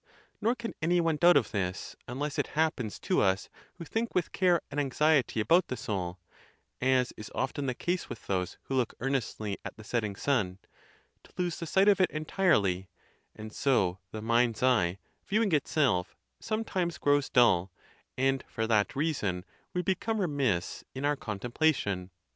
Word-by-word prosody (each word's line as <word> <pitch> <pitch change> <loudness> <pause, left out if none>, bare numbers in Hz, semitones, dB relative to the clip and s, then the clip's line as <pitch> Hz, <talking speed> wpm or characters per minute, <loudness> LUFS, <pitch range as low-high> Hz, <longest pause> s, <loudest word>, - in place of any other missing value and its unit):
Nor 230 +3 +2
can 235 -2 -5
any 175 +3 +3
one 165 -2 +1
doubt 175 +3 +6
of - - 0
this, 95 -3 -3
unless 140 +4 -3
it - - 0
happens 155 -9 0
to - - +2
us 95 0 +1 0.3
who 170 - -8
think 225 +8 -2
with 180 -3 +1
care 180 -3 +3
and 145 - -2
anxiety 145 -2 +2
about 170 +11 +4
the 130 - -4
soul 95 -4 -3 0.6
(as 130 -1 +2
is 105 - -8
often 135 +1 -2
the 125 - -1
case 175 +5 -2
with 120 - -8
those 90 -2 -2
who - - -5
look 125 -3 0
earnestly 115 -6 -2
at - - -7
the 110 - -11
setting 105 -2 -2
sun), 100 -8 0 0.7
to - - -20
lose 180 -2 -1
the 165 - -5
sight 195 +5 +3
of 200 -2 +5
it 180 - +4
entirely; 150 - +1 0.5
and 110 0 -9
so 95 -9 +1
the 110 -1 -7
mind's 115 0 +2
eye, 100 -9 +3 0.3
viewing 210 0 +2
itself, 140 - +1 0.2
sometimes 190 -6 -2
grows 145 -1 +2
dull, 95 -7 +4 0.5
and 135 0 +1
for 110 - -2
that 110 -2 +2
reason 110 - -1 0.3
we 180 - -1
become 210 +4 0
remiss 140 - 0
in 135 +2 -3
our 145 0 +2
contemplation. 105 - -1
130 Hz, 165 wpm, -30 LUFS, 105-165 Hz, 0.7 s, doubt